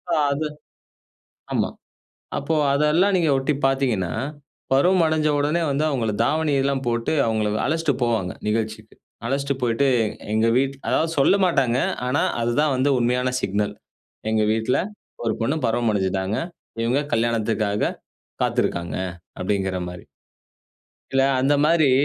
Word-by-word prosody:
அ - - +1
அது 150 +2 -1 1.1
ஆமா, - - +1 0.7
அப்போ 150 +3 -1 0.2
அதெல்லாம் 150 +7 +3
நீங்க 165 -3 +2
ஒட்டி 135 +3 0
பார்த்தீங்கன்னா, 125 -10 +1 0.6
பருவம் 175 +6 +4
அடஞ்ச 155 -1 +1
உடனே 150 +4 +1
வந்து 140 +2 0
அவுங்கள 115 -6 -1
தாவணி 155 +3 +1
எல்லாம் 135 0 0
போட்டு 115 +3 0
அவுங்க 110 -2 0 0.2
அழச்சிட்டு 160 -1 +1
போவாங்க. 110 -6 0 0.2
நிகழ்ச்சிக்கு, 110 0 -2 0.3
அழச்சிட்டு 140 +2 -1
போயிட்டு 120 +3 +2
எ - - +3 0.3
எங்க 110 +1 +3
வீட் 135 +1 +1
அதாவது 165 +1 +1
சொல்லமாட்டாங்க. 140 -7 +3 0.3
ஆனா, 130 +3 +1 0.2
அதுதான் 135 +5 +1
வந்து 130 +3 +2
உண்மையான 125 +1 +1
சிக்னல் 105 +1 -1 0.6
எங்க 110 -1 +2
வீட்ல 110 +3 +1 0.5
ஒரு 110 - +1
பொண்ணு 135 +7 +1
பருவம் 115 0 +1
அடஞ்சுட்டாங்க. 95 +1 -1 0.5
இவுங்க 125 +5 +1
கல்யாணத்துக்காக 110 -3 0 0.5
காத்திருக்கிறாங்க, 85 0 -1 0.4
அப்பிடிங்கிறமாரி. 95 -2 -2 1.1
இல்ல, 135 0 +4 0.2
அந்தமாரி 145 +2 +3
125 Hz, 120 wpm, -23 LUFS, 110-145 Hz, 1.1 s, பருவம்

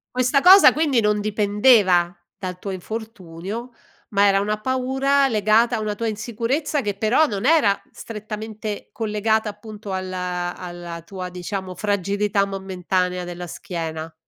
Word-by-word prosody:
Questa 255 +2 +2
cosa 380 +3 +9
quindi, 290 -6 +2
non 210 -1 +2
dipendeva 205 -4 +3 0.2
dal 180 -2 -6
tuo 200 - -6
infortunio, 210 +2 -6 0.4
ma 200 -1 +4
era 195 0 +3
una 210 +1 -1
paura 265 +2 +1
legata 225 +1 +3
a - - -3
una 210 -1 -2
tua 230 +2 -2
insicurezza 235 +7 -2
che 205 -3 -2
però, 220 +9 +3
non 210 -1 -2
era 265 -12 +4
strettamente 215 -1 -7
collegata, 220 0 0
appunto, 210 -1 -9
alla 180 -1 -3
alla 175 -1 -8
tua, 180 +1 -7
diciamo, 185 +1 -5
fragilità 200 +1 0
momentanea 185 -2 -2
della 175 0 -7
schiena? 160 -2 -6
205 Hz, 135 wpm, -22 LUFS, 185-225 Hz, 0.4 s, cosa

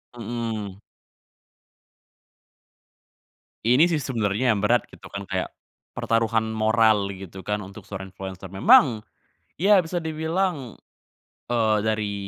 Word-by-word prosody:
Heeh. 110 -4 -4 2.9
Ini 130 +9 +5
sih 165 - +1
sebenernya 120 -3 0
yang 100 - -2
berat 120 +4 +2
gitu - - -13
kan, 100 0 -6
kayak 95 -1 -2 0.5
pertaruhan 115 -1 +1
moral 110 -2 +3
gitu 95 -1 -8
kan 105 +2 -2
untuk 100 +3 -11
seorang 95 -1 -7
influencer 95 0 -8
memang 110 +3 +5 0.6
ya 195 +3 +5
bisa 175 +1 -4
dibilang, 160 - -2 0.7
eee, 110 -3 +2
dari 110 -1 -1
110 Hz, 110 wpm, -24 LUFS, 100-125 Hz, 2.9 s, Ini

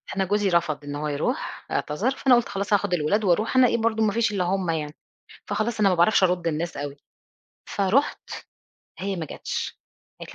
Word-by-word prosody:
أنا 195 -1 +1
جوزي 205 +1 +1
رفض 170 -4 0
إن 145 0 -6
هو 150 +1 -3
يروح، 145 -1 -3
اعتذر، 195 - 0
فأنا 260 -2 +4
قُلت 240 -1 +1
خلاص 200 +1 -2
هاخد 205 -2 +2
الولاد 180 +6 +1
وأروح 210 +6 +1
أنا 260 -1 +7
إيه 235 - +1
برضو 220 -1 +1
ما 215 - +2
فيش 230 -2 +1
إلا 195 -3 0
هُم 185 0 -1
يعني، 155 -2 -2 0.5
فخلاص 220 +1 -2
أنا 205 -2 +5
ما 185 - +2
باعرفش 175 +4 +4
أَرُد 180 -2 +1
النّاس 165 +2 -2
أوي، 145 0 -5 0.7
فرُحت 205 +9 0 0.7
هي 195 0 -3
ما 165 -3 -4
جاتش، - - -5 0.4
قالت - - -9
190 Hz, 190 wpm, -24 LUFS, 165-215 Hz, 0.7 s, أنا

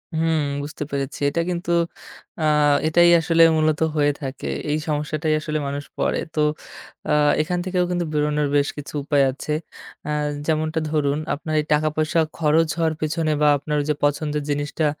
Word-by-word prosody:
হুম, 160 0 +1 0.2
বুঝতে 150 +1 -5
পেরেছি। 140 0 -3
এটা 170 - -1
কিন্তু, 175 -1 -2 0.7
আ - - +2 0.4
এটাই 175 +2 +5
আসলে 165 0 +4
মূলত 155 -1 +2 0.2
হয়ে 145 -1 +3
থাকে। 135 -1 -5 0.2
এই 150 - +1
সমস্যাটাই 155 +1 -1
আসলে 155 0 -2
মানুষ 140 +1 -4 0.2
পড়ে। - - +1 0.2
তো, 155 - +2 0.7
আ - - +4 0.3
এখান 175 +3 -1
থেকেও 185 -1 +1
কিন্তু 175 -1 -1
বেরোনোর 150 0 +1
বেশ 145 0 +3
কিছু 145 +1 -8
উপায় 145 -1 +3
আছে। 150 +3 -4 0.6
আ - - -1 0.4
যেমনটা 155 0 0
ধরুন, 145 -2 +1 0.2
আপনার 155 +2 -5
এই - - -8
টাকা 150 +1 +2
পয়সা 155 +2 +1 0.2
খরচ 160 +1 +3
হওয়ার 160 -1 +1
পেছনে 155 0 0
বা 150 - +5
আপনার 150 +2 -3
ওই - - -4
যে 150 - +2
পছন্দের 150 0 -1
জিনিসটা 145 +2 -1
155 Hz, 170 wpm, -22 LUFS, 145-160 Hz, 0.7 s, এটাই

